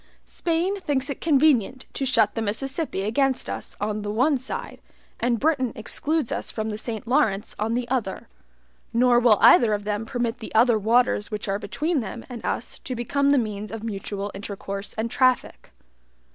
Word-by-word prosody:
Spain 345 +3 -1
thinks 285 -5 -1
it - - -7
convenient 275 -5 +3
to 270 - -2
shut 230 -5 +3
the 225 - -2
Mississippi 265 - -2
against 260 +5 +1
us - - -5
on 210 +1 -2
the 205 - -4
one 255 +8 +2
side, 260 0 -6 0.4
and 235 -1 +1
Britain 275 -5 +1
excludes 295 +5 -1
us - - -3
from 220 0 -3
the 210 - -4
Saint 225 +1 -5
Lawrence 220 -4 +1
on 220 +2 0
the 245 0 -2
other; 240 -7 -2 0.7
nor 240 0 +5
will 235 -3 +5
either 220 -4 +7
of 205 - -6
them 210 +1 -2
permit 240 0 -2
the 220 - -9
other 230 0 +5
waters 225 0 +2
which 210 -1 -4
are 195 +1 -1
between 295 - -1
them 230 +1 -6
and 240 -3 -7
us - - -3
to 255 - -5
become 280 +4 +1
the 285 - +5
means 215 -3 -2
of 225 -1 -6
mutual 205 -2 -4
intercourse 200 0 -6
and 225 +1 -2
traffic. 255 -1 +1
235 Hz, 180 wpm, -24 LUFS, 210-265 Hz, 0.7 s, either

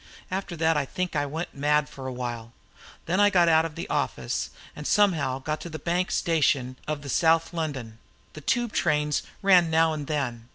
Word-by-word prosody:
After 190 -2 -3
that 160 0 +2
I 145 - 0
think 180 +4 -3
I 145 -1 0
went 160 +5 -5
mad 150 +1 +2
for 135 -1 -8
a - - -3
while. 120 -2 -5 0.5
Then 180 +4 0
I 205 0 +6
got 180 -4 +4
out 160 0 +5
of 160 -2 -6
the - - -5
office, 60 -2 -2 0.3
and 150 - -6
somehow 160 -11 +2
got 150 +3 -4
to 170 - -6
the 155 - -6
Bank 175 +4 -1
station 140 -6 +1
of 150 -1 -3
the - - -8
South 165 +4 +2
London 135 -9 -4 0.3
the 155 - -9
Tube 240 - 0
trains 150 0 +1 0.2
ran 180 -4 +6
now 160 0 +3
and 150 -2 -5
then. 125 -7 -3
155 Hz, 200 wpm, -26 LUFS, 140-170 Hz, 0.5 s, I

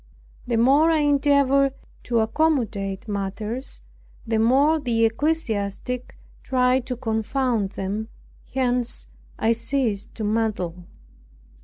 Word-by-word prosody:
The 235 -2 +1
more 275 +7 +5
I 320 -2 +3
endeavored 280 -1 +3 0.3
to 235 -2 +2
accommodate 220 -7 0
matters, 210 +5 -4 0.4
the 225 -1 0
more 275 +8 +4
the 230 -5 +1
ecclesiastic 240 -3 -2 0.2
tried 255 -1 +1
to 250 - -3
confound 225 -2 -1
them, 205 +3 -3 0.4
hence 245 -2 -1 0.3
I 225 - +2
ceased 230 -3 -1
to 220 - -5
meddle. 205 -5 -1
235 Hz, 105 wpm, -23 LUFS, 220-270 Hz, 0.4 s, more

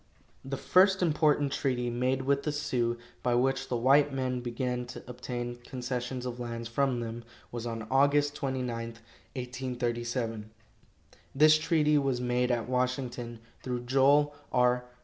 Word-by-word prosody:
The 135 0 -4
first 190 +4 +4
important 150 -3 +2
treaty 125 -3 -1
made 130 +2 0
with 140 +1 +2
the 150 - -1
Sioux, 120 -5 -1 0.2
by 120 -1 +1
which 135 +2 +1
the 125 - -1
white 140 +4 +4
men 130 -2 -1
began 125 0 -3
to - - -9
obtain 120 -1 -5
concessions 125 0 -4
of 125 -1 -5
lands 115 -1 -4
from 125 +1 0
them, 115 0 -5 0.3
was 120 0 -4
on 115 -1 -5
Aug. 145 +2 +3
29, 130 -3 -2
1837. 120 -1 -4 0.9
This 155 +2 +6
treaty 150 -1 +3
was 135 -3 0
made 125 0 +1
at 120 -2 0
Washington, 125 -2 -2 0.2
through 125 -1 -3
Joel 140 +4 +4 0.2
R. 125 0 +3
125 Hz, 140 wpm, -29 LUFS, 120-135 Hz, 0.9 s, This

